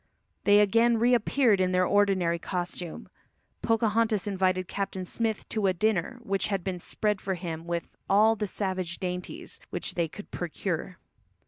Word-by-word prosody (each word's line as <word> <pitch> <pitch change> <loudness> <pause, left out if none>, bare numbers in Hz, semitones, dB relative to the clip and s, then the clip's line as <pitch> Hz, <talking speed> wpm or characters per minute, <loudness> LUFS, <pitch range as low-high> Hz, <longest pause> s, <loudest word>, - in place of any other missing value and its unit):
They 205 0 +7
again 230 +3 +4
reappeared 235 -2 +3
in 185 0 +1
their 180 0 +3
ordinary 185 -4 +2
costume. 175 -1 -4 0.5
Pocahontas 225 -2 +2
invited 185 -2 +1
Captain 195 -2 -3
Smith 220 +2 -2
to 215 -3 0
a 185 - +3
dinner 215 +5 0
which 195 -3 0
had 195 -3 -1
been 185 -1 -3
spread 210 +3 -1
for 190 -1 -2
him 165 -2 -6
with 170 -1 -1 0.3
"all 215 +3 +5
the 210 -1 -2
savage 185 -3 -2
dainties" 180 -1 -5
which - - -3
they 170 -1 0
could 205 +6 -11
procure. 175 +1 -3
195 Hz, 150 wpm, -28 LUFS, 180-215 Hz, 0.5 s, They